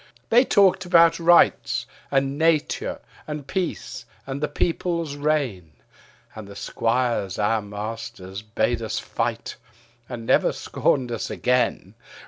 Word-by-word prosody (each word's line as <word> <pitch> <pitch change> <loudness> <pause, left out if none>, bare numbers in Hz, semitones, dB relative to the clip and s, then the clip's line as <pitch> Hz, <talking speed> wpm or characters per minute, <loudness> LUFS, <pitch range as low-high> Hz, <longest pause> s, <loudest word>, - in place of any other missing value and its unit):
They 240 +3 +6
talked 195 -4 +4
about 170 -1 +5
rights 170 +1 +4 0.2
and 135 0 +1
nature 160 0 0 0.3
and 150 -2 -5
peace 170 -7 -4 0.2
and 135 +1 -5
the 150 - +1
people's 170 -3 -1
reign: 140 - -1 0.6
And 110 -2 -9
the 100 - -11
squires, 115 -2 -1
our 110 +1 +1
masters, 105 -2 -7
bade 115 +2 -1
us 110 - -3
fight; - - -3 0.5
and 120 -3 -6
never - - +3
scorned 125 -3 0
us 115 - -3
again. 125 0 0
130 Hz, 120 wpm, -23 LUFS, 110-160 Hz, 0.6 s, They